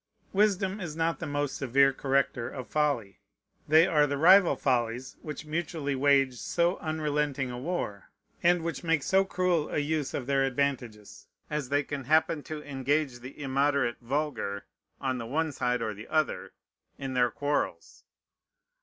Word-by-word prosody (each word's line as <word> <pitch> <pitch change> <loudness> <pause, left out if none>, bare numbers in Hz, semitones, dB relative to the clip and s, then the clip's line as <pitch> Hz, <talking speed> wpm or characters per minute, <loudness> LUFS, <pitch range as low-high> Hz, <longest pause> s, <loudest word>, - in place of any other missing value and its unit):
Wisdom 200 -1 +2
is 165 -5 -5
not 165 -2 0
the - - -4
most 145 -1 -2
severe 135 +1 +3
corrector 135 -3 0
of 130 -2 -7
folly. 140 -10 -1 0.5
They 160 +2 +6
are 150 -5 +3
the 140 0 -2
rival 180 +4 +6
follies 125 0 -1
which 150 -1 -7
mutually 155 -2 -2
wage 135 -1 +3
so 175 +2 +1
unrelenting 150 -4 -1
a 125 - -6
war, 125 - -4 0.3
and 175 -1 +3
which 170 +1 -4
make 165 -4 +1
so 190 0 +3
cruel 180 -4 0
a - - -2
use 150 -1 -1
of 130 - -3
their 135 0 +2
advantages, 125 -6 -3 0.2
as 150 -4 -2
they 145 +1 +2
can 140 -2 -5
happen 155 +2 +2
to 155 -1 -6
engage 135 -1 -1
the 130 +4 -11
immoderate 140 -2 +1
vulgar, 130 -6 -2 0.3
on 130 -2 -2
the 115 - -5
one 160 +5 0
side 125 -3 -1
or 110 -1 -2
the 105 +2 -10
other, 155 -1 -1 0.4
in 135 -1 -5
their 125 -1 +3
quarrels. 145 +4 -3
145 Hz, 160 wpm, -28 LUFS, 130-155 Hz, 0.5 s, They